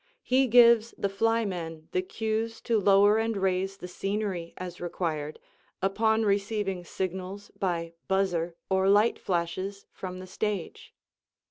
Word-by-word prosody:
He 260 +1 +3
gives 235 -1 +6
the 200 - 0
"flymen" 195 -7 -1
the 185 - +1
cues 220 +3 -2
to 230 -2 +1
lower 205 +2 +5
and 225 -1 0
raise 190 0 0
the 180 - -7
scenery 195 -2 -3
as 180 -1 -7
required, 160 -4 -3 0.4
upon 220 +3 +2
receiving 200 -2 0
signals 190 +3 -5
by 170 -3 -1
"buzzer" 175 -3 0
or 190 0 +2
"light 210 +3 +4
flashes" 185 +3 -2
from 185 -1 -7
the 185 - -8
stage. 195 -1 -4
195 Hz, 130 wpm, -28 LUFS, 180-215 Hz, 0.4 s, gives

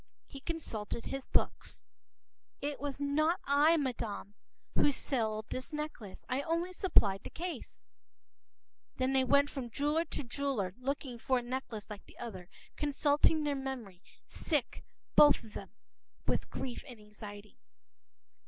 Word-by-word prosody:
He 275 - -10
consulted 235 -9 -3
his 270 -1 -4
books. - - 0 0.8
“It 290 0 -3
was 285 -1 -3
not 310 +5 +2
I, 295 +4 +5
madam, 230 -8 -2 0.4
who - - +5
sold 220 -6 0
this 255 - -3
necklace. 300 -10 -5
I 255 +2 0
only 335 +4 -1
supplied 205 - +4
the - - -6
case.” 350 +1 -6 1.1
Then 260 +1 +2
they 265 -1 +5
went 280 +2 +4
from 260 -4 -4
jeweler 295 +7 +1
to 305 - -4
jeweler, 240 -7 -1
looking 265 -2 -3
for 260 +2 +2
a 245 - -1
necklace 240 -4 -4
like 210 -2 -8
the - - -17
other, 200 -7 -7 0.3
consulting 295 +2 +3
their 295 -1 +1
memory,—sick 265 - -3 0.3
both 295 -4 +8
of 215 -2 -12
them 195 - -6 0.6
with - - 0
grief 250 -2 -4
and 245 -4 -10
anxiety. 210 0 -10
265 Hz, 135 wpm, -33 LUFS, 220-290 Hz, 1.1 s, both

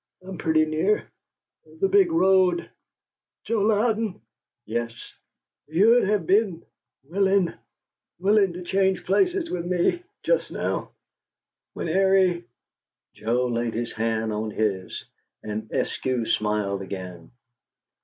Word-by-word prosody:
"I'm 185 -2 -8
pretty 155 0 +3
near 160 +7 0 0.7
the 195 - +3
big 195 -3 +4
road. 185 0 +3 0.8
Joe 225 -2 0
Louden 220 0 +1 0.2
" - - -67
"Yes?" 115 +1 -5 0.5
"You'd 210 +10 +4
have 200 -3 +1
been 190 -2 +1 0.4
willing 190 +2 +1 0.6
willing 195 0 +3
to 180 +1 -7
change 190 +1 +1
places 360 - +1
with 175 -1 -2
me 180 - +1 0.2
just - - +1
now - - -3 0.8
when - - -4
Airie 190 0 +3 0.3
" - - -67
Joe 120 +3 0
laid 120 -1 -2
his 120 +1 -3
hand 110 -1 -1
on 110 +1 -2
his, 105 -3 -2 0.4
and 110 +1 -5
Eskew 125 -3 -1
smiled 105 -2 0
again. 90 -3 -7
170 Hz, 115 wpm, -25 LUFS, -, 0.8 s, big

